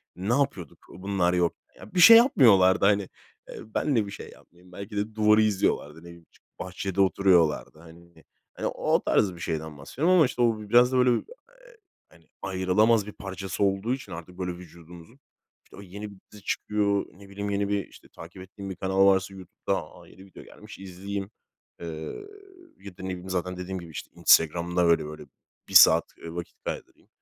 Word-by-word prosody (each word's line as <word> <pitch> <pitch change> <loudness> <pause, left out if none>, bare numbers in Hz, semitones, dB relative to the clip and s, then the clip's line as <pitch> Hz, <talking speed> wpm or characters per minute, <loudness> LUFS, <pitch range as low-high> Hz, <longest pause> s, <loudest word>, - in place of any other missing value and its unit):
ne 95 +6 -2
yapıyorduk 135 - -2 0.2
bunlar 95 -2 -1
yok. 90 -1 +1 0.3
Ya, 95 - -14
bir 180 - 0
şey 230 +6 +10
yapmıyorlardı, 100 - +5
hani, 100 -1 +2 0.4
eee, - - -9 0.2
ben 145 -4 0
de 110 -3 +1
bir 100 - -9
şey - - -9
yapmayayım. 90 +1 -20
Belki 100 +3 -8
de 105 +2 -3
duvarı 105 0 +4
izliyorlardı, 95 -7 -1
ne - - -19
bileyim, 85 -1 -14
çıkıp - - -31
bahçede 95 +1 -3
oturuyorlardı. 85 -6 +2
Hani, 85 0 -17 0.3
hani, - - -4
o - - 0
tarz 95 -3 +1
bir - - -13
şeyden 80 -3 -5
bahsediyorum 145 - -1
ama, 160 -5 +6
işte, 125 - -3
o 115 -2 +2
biraz 125 +2 +5
da 130 - +1
böyle, 125 0 +4
eee, - - -1 0.8
hani, 80 -2 -23
ayrılamaz 95 +4 +2
bir - - -7
parçası 95 0 -5
olduğu 100 +5 0
için 130 - -8
artık 85 +2 -10
böyle 90 -1 -3
vücudumuzun, 85 - -15 0.5
işte, - - -18
o 100 - -11
yeni 100 +3 -9
bir 100 - -14 0.2
dizi 105 -2 -14
çıkıyor, 100 -1 -1
ne 100 +1 -16
bileyim, 100 +1 -5
yeni 100 0 -1
bir, 100 -2 -2
işte, - - -18
takip 90 +3 -12
ettiğim 95 +1 -10
bir 90 - -6
kanal 95 +1 +2
varsa 95 0 +2
YouTube'da, 95 -2 -5 0.2
a, - - -16
yeni 95 - -16
video 95 - -14
gelmiş, - - -14
izleyeyim. 95 +2 -7 0.5
Eee, 85 - -7 0.9
ya 95 -3 -12
da - - -10
ne 95 - -5
bileyim, 90 +1 -7
zaten 90 0 -3
dediğim 95 +1 -5
gibi, 85 -1 -12
işte, - - -8
Instagram'da 85 +2 +3
böyle 85 -2 +3
böyle 75 0 -9 0.4
1 - - -9
saat, - - +8
eee, 85 0 -9
vakit 85 -1 -7
kaydırayım. - - -8
95 Hz, 190 wpm, -26 LUFS, 90-105 Hz, 0.9 s, şey